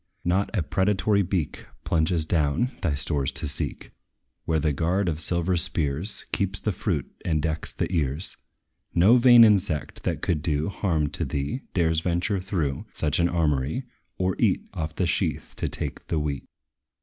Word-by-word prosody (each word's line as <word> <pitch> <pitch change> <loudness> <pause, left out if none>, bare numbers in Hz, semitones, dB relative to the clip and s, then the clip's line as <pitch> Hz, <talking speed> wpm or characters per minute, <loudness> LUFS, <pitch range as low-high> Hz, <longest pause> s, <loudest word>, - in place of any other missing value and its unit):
Not 95 +3 +1
a 90 - +1
predatory 100 +4 +2
beak 90 -5 -2 0.2
Plunges 80 0 +1
down, 80 - +1
thy 80 -6 +1
stores 70 -1 -1
to 80 - -1
seek, 70 - -4 0.5
Where 80 - +1
the 75 -1 +1
guard 90 +7 0
of 80 -3 -1
silver 85 +2 +1
spears 80 +3 -1
Keeps 100 0 +3
the 105 - -1
fruit, 90 - -2
and 80 -3 +1
decks 80 0 -2
the - - -1
ears. 75 0 -1 0.6
No 100 +8 +6
vain 120 -1 +8
insect, 100 -8 +2
that - - -2
could 80 -4 0
do 75 +1 0
Harm 80 -7 0
to - - 0
thee, 70 - -2
dares 80 -3 +2
venture 90 +4 0
through 80 -8 -2
Such 75 +2 0
an 85 +1 +3
armory, 80 - 0 0.3
or 95 0 0
eat - - +2
Off 80 -1 -4
the 90 - +1
sheath 85 - -1
to - - -2
take - - -5
the 80 - -1
wheat. 75 -2 -2
85 Hz, 165 wpm, -25 LUFS, 75-95 Hz, 0.6 s, vain